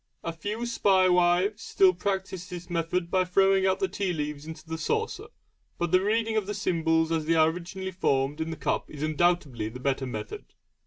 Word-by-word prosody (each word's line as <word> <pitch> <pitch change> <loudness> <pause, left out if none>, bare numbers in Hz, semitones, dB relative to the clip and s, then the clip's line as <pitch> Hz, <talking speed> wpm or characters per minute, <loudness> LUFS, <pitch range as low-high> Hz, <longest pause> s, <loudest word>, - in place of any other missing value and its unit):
A 165 - -3
few 210 +8 -4
spae 195 -5 +3
wives 180 +4 +3
still 190 -1 +4
practise 190 -1 -3
this 180 0 -8
method 170 +1 -1
by 185 -1 +3
throwing 195 +1 +3
out 190 - +1
the 385 - +1
tea 195 - -2
leaves 150 -1 -4
into 160 0 -9
the 160 0 -4
saucer, 450 - -2 0.5
but 175 -1 -1
the 185 - +5
reading 220 +2 +1
of 215 -3 0
the 205 - -3
symbols 165 -4 +1
as 160 -2 0
they 165 - +3
are 160 0 +5
originally 185 +2 -6
formed 145 -4 0
in 160 - -2
the 160 - -5
cup 140 - -2
is 150 0 -7
undoubtedly 155 -8 +1
the 125 +3 -9
better 135 0 -1
method. 110 -3 -6
175 Hz, 200 wpm, -27 LUFS, 160-190 Hz, 0.5 s, the